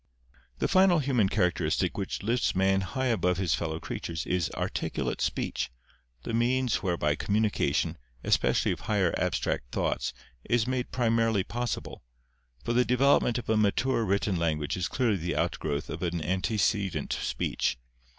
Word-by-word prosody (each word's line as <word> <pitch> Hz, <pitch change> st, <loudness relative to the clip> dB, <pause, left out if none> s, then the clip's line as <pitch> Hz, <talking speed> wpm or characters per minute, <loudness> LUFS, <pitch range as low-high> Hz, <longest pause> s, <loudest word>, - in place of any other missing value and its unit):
The -, -, 0 dB
final 185 Hz, -2 st, +5 dB
human 130 Hz, -9 st, +2 dB
characteristic 90 Hz, -3 st, +1 dB
which 95 Hz, -1 st, -4 dB
lifts 120 Hz, +4 st, +1 dB
man 95 Hz, +1 st, +3 dB
high 130 Hz, +8 st, -2 dB
above 90 Hz, -8 st, +1 dB
his 90 Hz, -5 st, +1 dB
fellow 80 Hz, +4 st, -2 dB
creatures 85 Hz, -1 st, -4 dB
is 90 Hz, -3 st, 0 dB
articulate -, -, -2 dB
speech, -, -, -1 dB, 0.5 s
the -, -, -4 dB
means 125 Hz, +1 st, +2 dB
whereby 85 Hz, -5 st, 0 dB
communica 105 Hz, -7 st, 0 dB
tion, -, -, 0 dB, 0.2 s
especially -, -, +2 dB
of -, -, -3 dB
higher 95 Hz, -5 st, +1 dB
abstract -, -, -1 dB
thoughts, -, -, -1 dB, 0.3 s
is 120 Hz, -2 st, +1 dB
made 130 Hz, 0 st, -2 dB
primarily 115 Hz, -4 st, +2 dB
possible; 120 Hz, +4 st, -4 dB, 0.6 s
for 120 Hz, -, -1 dB
the 125 Hz, +1 st, +4 dB
development 125 Hz, 0 st, +3 dB
of 120 Hz, -, -5 dB
a 110 Hz, -, +2 dB
mature 110 Hz, +4 st, +2 dB
written 100 Hz, -1 st, +1 dB
language 75 Hz, -3 st, 0 dB
is 90 Hz, -2 st, -1 dB
clearly 115 Hz, -3 st, +1 dB
the 85 Hz, 0 st, -3 dB
outgrowth 75 Hz, -1 st, -1 dB
of 80 Hz, -, -6 dB
antecedent 95 Hz, +4 st, 0 dB
speech. -, -, -1 dB
100 Hz, 145 wpm, -28 LUFS, 90-120 Hz, 0.6 s, final